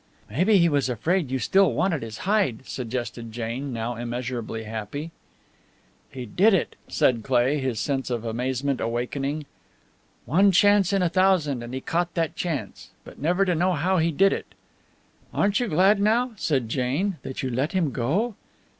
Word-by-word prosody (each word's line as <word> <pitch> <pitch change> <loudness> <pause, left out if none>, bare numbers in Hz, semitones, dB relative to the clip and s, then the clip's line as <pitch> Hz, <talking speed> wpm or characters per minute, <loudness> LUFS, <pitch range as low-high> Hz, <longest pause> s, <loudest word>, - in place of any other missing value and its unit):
"Maybe 185 - +3
he 170 -2 +5
was 145 -4 +1
afraid 160 - 0
you 130 - 0
still 190 +3 +3
wanted 165 +4 0
his 110 -1 -7
hide," 190 - +1
suggested 120 -2 -5
Jane, 120 +4 -4
now 115 0 -3
immeasurably 120 -1 -4
happy. 110 +9 -5 1.0
"He 125 -2 -7
did 195 - +4
it!" 185 - -1
said 120 -3 +2
Cleigh, 130 +3 +2
his 130 -5 -2
sense 135 +3 -1
of 120 -2 -3
amazement 130 +4 -1
awakening. 135 +6 -2 0.8
"One 190 - +4
chance 205 0 +4
in 195 -2 +2
a 175 - +2
thousand, 175 -7 +2
and 120 0 -7
he 130 +1 -4
caught 170 +3 -1
that 165 -2 -1
chance! 145 - -4
But - - -13
never 180 +6 +2
to 180 - +1
know 180 +3 +2
how 180 +4 +1
he 165 +1 +2
did 195 +6 +4
it!" - - -7 0.8
"Aren't 200 0 +2
you 245 - 0
glad 195 +4 +4
now," 235 +4 +2
said 135 - 0
Jane, 140 - -1
"that 130 - -6
you 130 - -2
let 135 +8 -1
him 170 -7 +1
go?" 170 - 0
140 Hz, 170 wpm, -25 LUFS, 120-185 Hz, 1.0 s, he